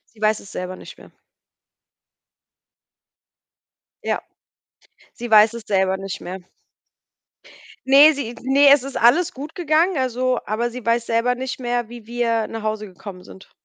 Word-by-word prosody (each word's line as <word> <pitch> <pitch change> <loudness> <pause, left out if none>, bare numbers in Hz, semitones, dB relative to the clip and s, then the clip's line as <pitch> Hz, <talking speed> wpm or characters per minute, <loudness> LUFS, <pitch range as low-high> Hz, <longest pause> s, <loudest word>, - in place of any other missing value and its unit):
Sie 215 - -19
weiß 215 0 +1
es 195 - -14
selber 180 0 -6
nicht - - -13
mehr. - - -17 2.9
Ja, - - -1 0.9
sie 240 -1 -8
weiß 215 +1 +6
es 235 - -8
selber 190 -2 +1
nicht 195 0 -6
mehr. 185 +1 -7 1.5
Ne, 280 +4 +7
sie 250 -5 -5
ne, 275 +2 +4
es 280 -2 +6
ist 275 +1 -5
alles 270 +10 +4
gut 290 +4 -9
gegangen, 335 +1 +1
also 255 -1 0
aber 225 +3 -2
sie 250 -1 -9
weiß 235 0 0
selber 235 +2 +1
nicht 260 +1 -5
mehr, 240 -2 -2
wie 235 -2 -12
wir 230 -2 -1
nach 225 -1 -7
Hause 215 0 -3
gekommen 185 0 -11
sind. 190 - -15
235 Hz, 150 wpm, -21 LUFS, 215-260 Hz, 2.9 s, Ne